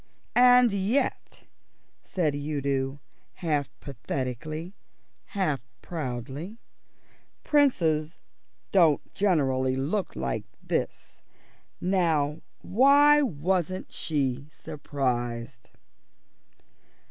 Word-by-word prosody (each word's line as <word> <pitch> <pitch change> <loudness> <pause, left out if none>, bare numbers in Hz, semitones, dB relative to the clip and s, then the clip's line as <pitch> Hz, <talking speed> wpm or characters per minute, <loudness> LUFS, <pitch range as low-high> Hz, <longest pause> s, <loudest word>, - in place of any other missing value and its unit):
"And 245 -2 +6
yet," 200 +8 -1 0.6
said 155 -6 -1
Udo 140 -2 -2 0.3
half 150 -6 -1
pathetically, 140 - -5 0.5
half 165 - -1 0.2
proudly, 145 - -5 0.9
"Princes 165 - +2 0.5
don't 165 -6 +3
generally 135 -9 +2
look 160 +10 -2
like 65 0 -2 0.2
this. - - -3 0.6
Now, 165 -5 +1 0.2
why 285 +7 +6
wasn't 185 - -1
she 140 -2 -2
surprised?" 120 -4 -3
155 Hz, 65 wpm, -27 LUFS, 135-190 Hz, 0.9 s, And